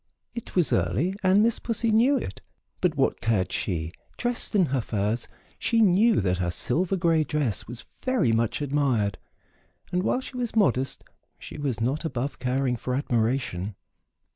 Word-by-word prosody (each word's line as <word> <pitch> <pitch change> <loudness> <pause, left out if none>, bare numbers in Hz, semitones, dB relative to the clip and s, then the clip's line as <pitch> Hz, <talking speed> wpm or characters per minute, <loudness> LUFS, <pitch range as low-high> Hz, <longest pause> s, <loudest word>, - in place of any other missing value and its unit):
It 235 -1 -8
was 175 -8 +3
early 95 - +1
and 190 +2 +4
Miss 230 0 +2
Pussy 230 -1 0
knew 245 +6 +4
it, - - -6 0.4
but 180 -4 +1
what 135 - +1
cared 110 -5 +1
she, 85 -4 -2 0.3
dressed 240 -2 -1
in 190 -4 +5
her 135 -3 0
furs; 110 +2 -2 0.3
she 230 - +1
knew 215 +2 +5
that 90 -2 0
her 85 -1 0
silver 160 - +1
gray 165 -3 +2
dress 145 -9 -1
was 120 +1 -9 0.2
very 255 - +2
much 115 +5 0
admired, 130 -9 0 0.7
and 180 - +1
while 250 - +1
she 260 - -9
was 240 -3 -3
modest 135 - +1 0.3
she - - -9
was 135 -6 -2
not 130 +8 -1
above 140 -3 -3
caring 125 0 0
for 125 +2 -3
admiration. 115 -7 -1
140 Hz, 165 wpm, -26 LUFS, 115-190 Hz, 0.7 s, in